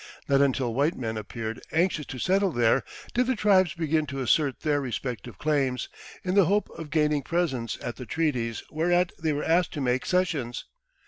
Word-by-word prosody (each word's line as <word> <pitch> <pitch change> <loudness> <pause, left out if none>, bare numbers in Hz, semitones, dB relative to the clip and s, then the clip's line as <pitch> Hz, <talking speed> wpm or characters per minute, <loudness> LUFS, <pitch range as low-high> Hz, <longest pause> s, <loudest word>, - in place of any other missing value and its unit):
Not 140 0 +4
until 130 -4 +1
white 145 +7 +1
men 115 -3 -3
appeared 110 +1 -5
anxious 165 -3 +1
to 130 - -6
settle 190 - +2
there 120 0 +3 0.3
did 250 +1 +2
the 260 - +2
tribes 190 -5 +3
begin 160 -2 0
to 135 -1 -5
assert 135 +1 +2
their 145 -2 +1
respective 120 -4 -5
claims, 135 -4 0 0.3
in 185 - -1
the 200 -2 +6
hope 205 +5 +1
of 160 -2 -8
gaining 150 -1 +2
presents 140 -9 -1
at 120 - -4
the 125 - -7
treaties 125 -7 -1
whereat 175 +3 +2
they 160 -1 +1
were 145 0 -2
asked 170 +2 +2
to 145 - -3
make 125 0 0
cessions. 160 -10 0
150 Hz, 185 wpm, -27 LUFS, 125-170 Hz, 0.3 s, the